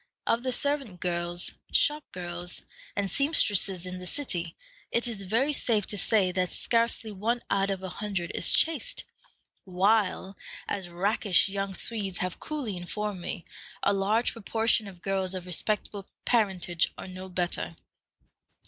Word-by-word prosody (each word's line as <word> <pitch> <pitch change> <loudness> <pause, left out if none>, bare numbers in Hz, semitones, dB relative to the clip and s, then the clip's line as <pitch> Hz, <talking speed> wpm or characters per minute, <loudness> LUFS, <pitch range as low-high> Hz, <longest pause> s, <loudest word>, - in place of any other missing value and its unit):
Of 230 - +2
the 255 +1 0
servant 275 -9 +1
girls, 175 0 0 0.2
shop 300 0 +4
girls, 175 0 -5 0.3
and 200 -1 +1
seamstresses 200 - +1
in 180 0 -5
the 180 - -6
city, 175 - -1 0.4
it 235 +1 +2
is 220 -4 -4
very 230 +10 +1
safe 220 -7 +1
to - - -6
say 200 -2 +3
that 180 0 0
scarcely 230 -1 +1
one 225 +5 -1
out 195 0 +3
of 190 -1 -2
a 190 - -3
hundred 190 -1 -3
is - - +2
chaste, 330 +10 +1 0.6
while, 195 +1 +2 0.3
as 190 -3 -3
rakish 195 +2 +2
young 195 -1 -2
Swedes 200 -5 +1
have 180 0 -2
coolly 285 -10 -3
informed 200 +2 -3
me, 175 0 -5 0.4
a 200 - +5
large 205 +4 +2
proportion 225 0 +2
of 185 -3 -12
girls 190 -1 0
of 180 -1 -4
respectable 200 +2 0 0.2
parentage 185 -7 +2
are - - -7
no 185 0 -8
better. 175 - -2
195 Hz, 150 wpm, -29 LUFS, 180-225 Hz, 0.6 s, a